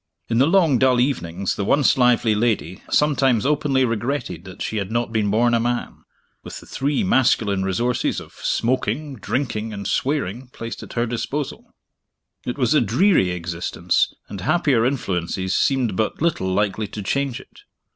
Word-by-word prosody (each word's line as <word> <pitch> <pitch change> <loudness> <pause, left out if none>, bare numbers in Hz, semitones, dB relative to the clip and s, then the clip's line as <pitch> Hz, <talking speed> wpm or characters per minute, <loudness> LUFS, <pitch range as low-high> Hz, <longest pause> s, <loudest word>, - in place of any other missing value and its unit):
In 115 0 +1
the 135 - +5
long 165 -8 +4
dull 130 -2 +4
evenings, 95 -8 -1
the 100 - -2
once 140 +7 +3
lively 125 -3 +3
lady 105 -6 -1
sometimes 135 -6 +2
openly 140 -2 +2
regretted 115 - -3
that 95 +1 -11
she 110 - -3
had 100 0 -3
not 115 0 -1
been 105 -2 +1
born 120 +3 +2
a 115 - +3
man 120 +1 -3 0.4
with - - -8
the - - -15
three 145 +8 -1
masculine 115 - +2
resources 120 +6 0
of - - -13
smoking, 130 +4 -1
drinking, 115 0 -2
and 100 -1 -6
swearing 130 -4 -1
placed 115 -2 -7
at - - -10
her 120 0 0
disposal. 130 +4 -4 0.8
It 125 - -3
was 130 +1 +2
a 150 - +4
dreary 125 - +3
existence, 85 -1 -1 0.2
and 100 - -7
happier 130 - +2
influences 95 -7 -2
seemed 130 -7 +1
but 110 +3 -1
little 150 - 0
likely 105 +2 0
to 105 +1 -7
change 140 +3 -1
it. - - -17
120 Hz, 165 wpm, -22 LUFS, 100-135 Hz, 0.8 s, the